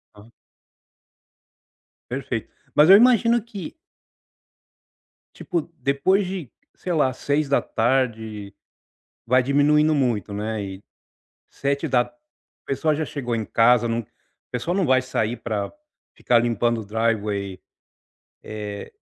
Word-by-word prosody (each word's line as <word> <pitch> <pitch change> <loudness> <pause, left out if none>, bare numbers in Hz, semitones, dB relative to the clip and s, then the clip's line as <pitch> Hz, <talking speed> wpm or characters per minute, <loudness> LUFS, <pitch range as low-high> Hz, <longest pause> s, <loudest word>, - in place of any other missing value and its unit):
Aham. 105 +3 -16 1.8
Perfeito. - - -4 0.3
Mas, 150 +3 +6
eu 195 - +11
imagino 235 +1 +5
que 205 - -9 1.6
tipo, 175 -3 -2 0.2
depois 185 +9 +2
de, 180 -9 -6 0.2
sei 180 - -4
lá, 140 -5 +2
18h 120 -7 -1 0.7
vai 130 +2 +4
diminuindo 150 +3 +3
muito, 120 -8 0
né, 105 0 -3
eh - - -17 0.7
7 140 +3 -2
da 125 -3 +1 0.5
pessoa 150 +3 0
já 155 +2 -1
chegou 125 -5 -4
em 110 -1 -2
casa, 120 0 +4
não 115 0 0
a 110 - -12 0.5
pessoa 165 +9 -2
não 195 - +2
vai 130 -1 +4
sair 120 -2 -2
pra 110 -3 -3
pra - - -27 0.4
ficar 120 - +2
limpando 120 0 0
o - - -11
driveway 105 -3 -1 0.9
eh 105 -1 -7
125 Hz, 115 wpm, -23 LUFS, 110-150 Hz, 1.8 s, eu